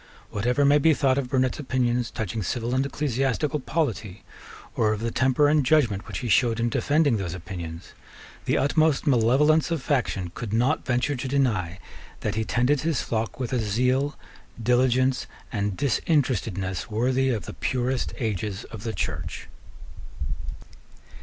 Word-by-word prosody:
Whatever 125 +7 +1
may 145 +1 +5
be 160 +1 +4
thought 135 -2 +2
of 130 -3 -4
Burnet's 130 +2 +1
opinions 125 -3 0
touching 110 0 -3
civil 120 +4 -2
and 130 +1 +2
ecclesiastical 140 +1 -1
polity, 115 - -2 0.5
or 110 -1 +2
of 105 - -4
the 115 0 -1
temper 130 +4 +3
and 150 0 +3
judgment 120 -8 +2
which - - -5
he - - -1
showed 115 0 +3
in 120 0 +1
defending 145 0 +2
those 95 -3 -3
opinions, 85 -2 -7 0.6
the - - +2
utmost 155 +1 +2
malevolence 145 +5 +4
of 165 -1 0
faction 100 - -1
could 115 -4 -5
not 125 +7 +2
venture 125 +3 +1
to 130 +1 -4
deny 110 -11 0 0.4
that - - -1
he 110 - -1
tended 125 +5 +1
his 160 -4 0
flock 115 +1 -3
with 125 -1 -3
a 125 - +2
zeal, 125 +7 +1 0.5
diligence, 130 +2 +2 0.2
and 100 -3 -2
disinterestedness 115 - 0
worthy 130 +4 +1
of 110 -8 -1
the - - -7
purest 125 0 -1
ages 105 -2 -3
of 110 - -7
the 115 0 -4
Church. - - -4
125 Hz, 155 wpm, -25 LUFS, 110-140 Hz, 0.6 s, may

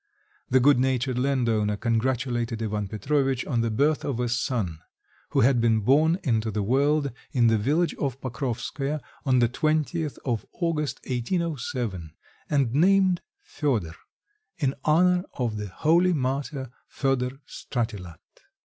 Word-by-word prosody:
The 130 - +5
good 135 0 +5
natured 130 -1 0
landowner 115 -6 +1
congratulated 120 0 -1
Ivan 105 -2 -2
Petrovitch 135 +5 0
on 120 -5 0
the 115 - 0
birth 145 +7 +1
of 130 -4 -2
a 120 -1 0
son, 115 - -1 0.5
who - - +2
had 120 +1 +4
been 115 -2 +3
born 155 - +4
into 115 -5 +1
the 105 -1 -1
world 140 +5 +2 0.2
in 120 -3 +3
the 110 - +3
village 150 +10 +1
of 135 -2 -2
Pokrovskoe 135 +3 -3 0.3
on 130 -1 +4
the 120 -1 +4
20th 155 +4 -1
of 120 -5 -1
August, 150 -7 -2
1807, 125 - -3 0.3
and 135 -5 +1
named 185 +3 +4 0.2
Fedor, 115 - -1 0.6
in 135 -2 0
honour 180 +3 +4
of 115 -4 -2
the 105 0 -4
holy 170 - +3
martyr 135 -1 -2 0.2
Fedor 130 -1 -1
Stratilat. 105 - -4
130 Hz, 135 wpm, -26 LUFS, 115-145 Hz, 0.6 s, The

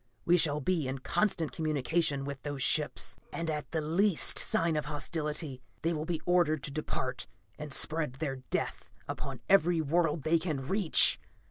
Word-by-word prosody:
We 175 - +5
shall 150 -4 +2
be 160 -1 0
in 130 +1 -3
constant 165 +3 0
communication 155 -1 0
with 140 -1 -6
those 145 -3 -3
ships, 150 -1 +1
and 165 -1 -3
at 150 -1 -4
the 160 - -2
least 170 +4 +3
sign 165 -1 +2
of 150 -1 -1
hostility, 150 -2 -3 0.2
they 165 +1 +1
will 155 -1 -3
be 165 -1 -3
ordered 170 -5 +2
to - - -5
depart 130 -3 -3 0.3
and 150 -1 -6
spread 155 -1 +1
their 135 -2 -3
death 130 - -4 0.2
upon - - -5
every 175 -3 +4
world 160 0 +1
they 165 +1 +3
can 150 -6 -3
reach. 190 -2 +5
155 Hz, 165 wpm, -30 LUFS, 145-165 Hz, 0.3 s, We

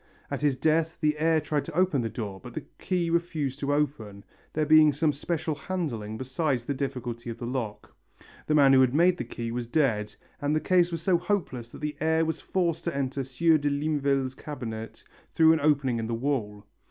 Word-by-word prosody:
At - - -3
his 145 -3 +2
death 160 +3 +1
the 150 -2 +2
heir 160 0 +3
tried 150 -1 -1
to 165 - -8
open 180 -8 +3
the 115 - -2
door 105 -5 -5
but 125 +2 -11
the 155 - -5
key 175 -3 -1
refused 160 -5 -1
to 140 0 -1
open, 135 -9 -2 0.3
there 155 0 +1
being 155 0 +7
some 150 +1 +1
special 160 +2 -2
handling 140 - -4
beside 130 +1 -1
the 130 +4 -3
difficulty 125 -4 -4
of 115 - -5
the 120 - -6
lock. 120 -4 -5 0.5
The 150 - +2
man 140 -2 +6
who 130 - +7
had 130 +1 +3
made 175 +3 +4
the - - -3
key 115 -1 -5
was 120 0 -3
dead 115 -7 0 0.3
and 145 +1 +1
the - - +3
case 175 +1 +3
was 165 -1 -4
so 180 -2 +3
hopeless 170 - -2
that - - -12
the 150 0 -3
heir 160 +1 +2
was 160 - -3
forced 170 -4 -1
to 170 -5 -2
enter 135 0 -1
Sieur 155 +5 +2
de 145 0 0
Limeville's 140 -2 0
cabinet 115 -6 -7 0.3
through 160 0 +6
an 160 - +1
opening 140 -5 +2
in 110 - -3
the 115 - -1
wall. 115 -5 -2
145 Hz, 210 wpm, -27 LUFS, 125-160 Hz, 0.5 s, being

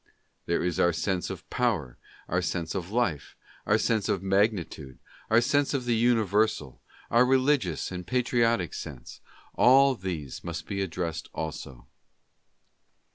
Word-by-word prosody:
There 85 - 0
is 90 -2 -1
our 85 - +4
sense 90 +2 -1
of 95 -1 -8
power, 100 - 0 0.3
our 90 +2 0
sense 85 -1 -3
of 90 -2 -4
life, 105 - -1 0.3
our 105 - +4
sense 110 -2 0
of 95 - 0
magnitude, 95 - 0 0.3
our 115 +2 +5
sense 145 +3 +1
of 130 -3 -2
the 120 -1 +1
universal, 110 - +1 0.3
our 120 +2 +6
religious 130 - +1
and 90 0 -5
patriotic 115 -6 +1
sense 70 -7 -8 0.2
— - - -27
all 135 +2 +7
these 90 - -6
must 80 -3 -5
be 100 -1 -3
addressed 85 -3 -4
also. 70 -6 -6
95 Hz, 140 wpm, -27 LUFS, 85-120 Hz, 0.3 s, all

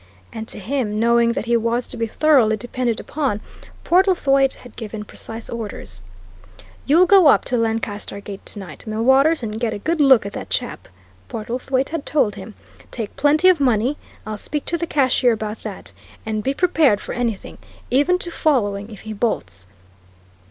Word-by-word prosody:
And 220 0 -6
to - - -6
him, 215 -1 -2
knowing 235 0 +3
that 235 - -3
he 235 0 +2
was 235 +2 0
to - - -7
be 230 -1 -2
thoroughly 240 -4 +3
depended 240 0 -2
upon, 275 -9 -2 0.4
Portlethwaite 330 -8 +3
had 245 - -15
given 215 -1 -6
precise 225 +2 -7
orders. 195 - -7 0.9
"You'll 330 +6 +6
go 375 -3 +6
up - - +5
to 250 - 0
Lancaster 225 -3 -2
Gate 200 -1 -9
tonight, 190 -7 -9
Millwaters, 265 +7 +3
and 215 0 -4
get 225 -3 -1
a - - -4
good 320 +9 -1
look 265 -7 +6
at 200 - -6
that - - -7
chap," - - -3 0.4
Portlethwaite 255 +4 -2
had 320 -3 -4
told 275 -9 +2
him. 200 +2 -10 0.3
"Take 225 -4 -6
plenty 300 +5 +3
of 365 -4 +5
money 250 0 +2 0.3
I'll 215 -1 -5
speak 295 +7 -4
to 340 - -1
the 340 - -2
cashier 260 -5 +3
about 215 0 -5
that 190 - -8 0.3
and 215 -1 -2
be 270 +4 -1
prepared 315 - +3
for - - -6
anything, 235 -5 -3 0.3
even 290 +8 +3
to 345 -1 -4
following, 205 -11 0
if 215 - -11
he 220 - -7
bolts. 95 - -3
235 Hz, 175 wpm, -21 LUFS, 215-280 Hz, 0.9 s, You'll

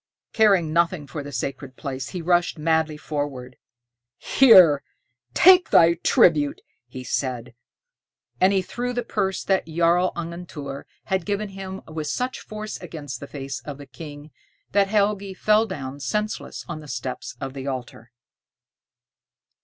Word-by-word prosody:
Caring 195 -8 +4
nothing 170 -2 +1
for 145 +1 -6
the 145 0 -8
sacred 135 +1 -5
place, 130 -3 -5
he 180 -3 -5
rushed 175 0 +2
madly 160 0 +1
forward. 145 -5 -4 0.6
"Here, 180 - +7 0.5
take 365 0 +7
thy 170 0 +6
tribute," 150 -3 +3 0.4
said 125 -2 -2
he, - - -22 0.9
and 190 - +6
he 190 -2 +1
threw 245 +6 -4
the 245 0 -2
purse 195 -4 -2
that 190 -3 +1
Jarl 170 +2 +2
Angantyr 165 -5 -6 0.2
had 190 -3 -1
given 205 +1 -2
him 190 0 -7
with 155 -1 -5
such 250 - -2
force 215 0 -7
against 145 -8 -7
the 140 - -8
face 135 -2 -6
of 145 -2 -7
the 145 - -10
King 145 -1 -10 0.4
that 200 0 +3
Helgi 200 -1 0
fell 215 +3 +3
down 140 -7 -6
senseless 210 +9 -3
on 170 -3 -5
the 150 - -12
steps 130 -3 -5
of 135 -1 -5
the 135 0 -6
altar. 120 -3 -6
165 Hz, 145 wpm, -24 LUFS, 140-195 Hz, 0.9 s, Here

